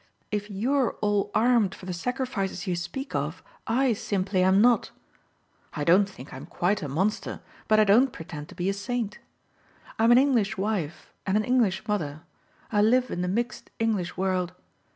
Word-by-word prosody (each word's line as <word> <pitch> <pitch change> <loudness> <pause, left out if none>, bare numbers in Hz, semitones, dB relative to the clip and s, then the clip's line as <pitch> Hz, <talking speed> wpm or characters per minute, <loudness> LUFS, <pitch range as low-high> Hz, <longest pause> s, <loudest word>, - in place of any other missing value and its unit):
If 210 0 -2
you're 245 +6 +1
all 205 -1 +1
armed 225 -4 +3
for - - -12
the 185 - -3
sacrifices 200 -2 -3
you 180 -3 -1
speak 175 +11 -5
of 150 +4 -3 0.2
I 250 +2 +2
simply 195 -2 -1
am 190 +1 +4
not. 240 +1 +4 0.9
I 150 - -2
don't 190 +6 +4
think 135 -7 -12
I'm 135 +4 -8
quite 185 +4 0
a 150 - -3
monster, 190 +10 -1 0.3
but 215 0 +4
I - - +7
don't 230 +6 +5
pretend 155 -5 -8
to - - -12
be 175 - -2
a 195 - +2
saint. 210 +1 -3 0.8
I'm 225 +1 +5
an 240 - +8
English 240 -8 +2
wife 190 -6 -3
and 195 +2 +2
an 215 - +1
English 220 -4 +1
mother 155 -7 -2 0.5
I 205 -2 +3
live 250 +4 +3
in 175 - -2
the 180 - -1
mixed 235 +6 -2
English 210 -7 -1
world. 185 -1 -1
200 Hz, 175 wpm, -26 LUFS, 180-230 Hz, 0.9 s, an